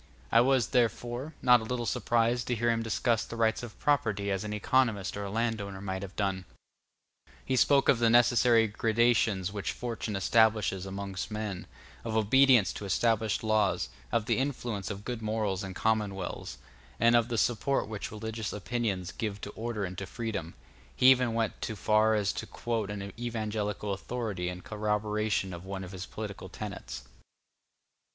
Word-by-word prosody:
I 115 - +6
was, 130 -2 +3
therefore, 120 +4 0
not 125 -2 +6
a - - -5
little 120 +1 -2
surprised 120 +1 +1
to 125 - 0
hear 120 +1 +2
him 115 0 0
discuss 115 0 +1
the - - -8
rights 115 -1 +1
of 120 -4 -9
property 105 -9 +1
as 95 +1 -1
an 105 - -5
economist 105 -2 +1
or 100 - -4
a - - -4
landowner 110 -3 -2
might 95 -1 -4
have 95 -1 -8
done: 95 -2 -1 1.0
he 130 - 0
spoke 140 +2 +4
of 125 - +5
the 115 -1 +4
necessary 120 -1 +5
gradations 110 -3 +1
which 100 -2 -2
fortune 115 -3 -4
establishes 105 -1 +2
among 100 0 -6
men, 105 -4 -4 0.4
of 110 -1 -2
obedience 120 -2 +5
to 105 - -6
established 110 +2 +1
laws, 110 -2 +1 0.2
of 110 - +1
the - - +1
influence 120 -7 -2
of 100 -1 -6
good 120 -2 -4
morals 105 -3 -1
in 95 -1 -6
commonwealths, 105 -4 -2 0.4
and 115 +1 +5
of 120 -1 +4
the 120 -1 -2
support 120 +5 +1
which 105 -2 -5
religious 110 0 -4
opinions 105 -4 -2
give 105 -3 -4
to 100 - -6
order 110 -2 -3
and 90 0 -6
to 95 - -5
freedom; 100 -5 -4 0.4
he 130 +1 +7
even 125 -3 +2
went 115 -2 -1
to 110 - -3
far 110 +2 +3
as 105 -2 +1
to - - -5
quote 115 -4 -3
an 100 -1 -5
evangelical 105 -3 -2
authority 100 -4 -3
in 90 0 -6
corroboration 105 -2 -1
of 85 0 -8
one 95 0 -5
of 90 - -8
his 95 -1 -7
political 105 -2 -7
tenets. - - -7
110 Hz, 170 wpm, -30 LUFS, 100-120 Hz, 1.0 s, he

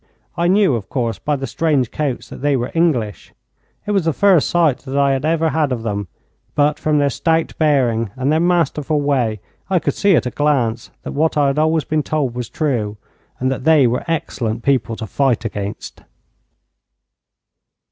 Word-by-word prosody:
I 170 - +1
knew, 195 -4 +4
of 110 -5 -4
course, 120 -4 -2
by 150 - -1
the 135 -1 -4
strange 135 -2 0
coats 145 -5 -3
that - - -10
they 145 -1 +2
were 120 0 -3
English. 135 - 0 0.5
It 210 - -2
was 195 -5 +1
the 165 - +1
first 190 -4 +4
sight 165 -7 +2
that 135 0 -5
I 140 -1 +3
had 135 +1 -1
ever 165 0 +1
had 150 -1 0
of 120 -3 -2
them, 100 -3 -3 0.5
but 150 0 +2
from 155 -1 +1
their 145 -1 +2
stout 165 +4 0
bearing 125 -8 +2
and 130 +2 0
their 155 - +3
masterful 160 -4 +1
way 125 -8 0 0.3
I 190 - +2
could 160 - 0
see 200 -3 +3
at 130 - +1
a 125 - -2
glance 125 -6 0
that - - -5
what 155 +2 0
I 145 - +4
had 140 +2 +1
always 160 0 +2
been 155 +2 0
told 145 -4 -1
was 125 -2 -5
true, 115 -9 -2 0.4
and 130 +1 0
that 130 -1 -4
they 155 -3 +5
were 120 +1 0
excellent 120 -8 -2
people 130 -4 +1
to 110 - -6
fight 120 -1 0
against. 100 -2 -5
140 Hz, 190 wpm, -19 LUFS, 120-155 Hz, 0.5 s, they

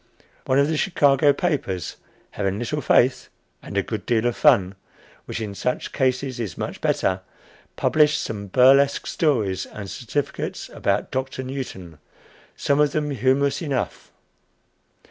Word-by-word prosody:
One 130 - +3
of 140 +1 +4
the 155 0 0
Chicago 145 -5 +4
papers, 140 - -2 0.3
having 100 -1 -2
little 135 +6 -2
faith 125 -2 +3 0.3
and - - -6
a - - +2
good - - -5
deal 115 -1 +2
of 120 - +1
fun 105 -11 +4 0.5
which - - -5
in 105 -3 -4
such 125 +5 -2
cases 130 -1 0
is 110 -6 -4
much - - -5
better 95 0 0 0.5
published 150 -1 +3
some 100 -2 -5
burlesque 135 +6 +4
stories 110 - 0
and 100 -2 -8
certificates 130 +3 -4
about 100 +1 -1
"Doctor" 130 0 -3
Newton, 110 - -7 0.6
some 140 0 +1
of 150 -1 +3
them 150 -1 -1
humorous 135 +3 +1
enough. 140 -6 -3
130 Hz, 140 wpm, -23 LUFS, 105-140 Hz, 0.6 s, of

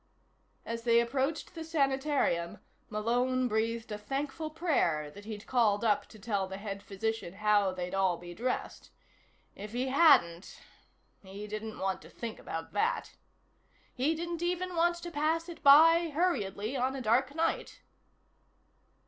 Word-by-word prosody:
As 230 0 -4
they 235 0 +4
approached 270 +8 -1
the 325 -2 -6
sanitarium, 275 - 0 0.3
Malone 245 +4 +1
breathed 225 0 -1
a 210 - -4
thankful 275 +7 -3
prayer 245 - 0
that 205 +5 -12
he'd 215 -1 -7
called 225 -4 +2
up 210 -2 +2
to 220 - -15
tell 200 -2 -2
the 190 0 -6
head 200 -1 -6
physician 200 -1 -3
how 205 -2 +3
they'd 180 -1 -5
all 190 -3 +2
be 175 0 -10
dressed. 250 +7 -4 0.6
If 210 +2 -9
he 255 +2 -1
hadn't.... 260 - +4 0.6
He 200 +2 -8
didn't 215 +1 -6
want 190 0 -2
to - - -14
think 230 -2 -7
about 165 0 -6
that. 455 +3 0 0.8
He 280 +6 +1
didn't 340 +1 -4
even 360 +1 -2
want 345 +1 +3
to 345 0 -8
pass 320 +2 0
it 345 - -9
by 325 +4 +7
hurriedly 255 - -1
on 260 +1 0
a 270 - -4
dark 255 +5 +2
night. 330 0 -2
235 Hz, 150 wpm, -31 LUFS, 205-305 Hz, 0.8 s, by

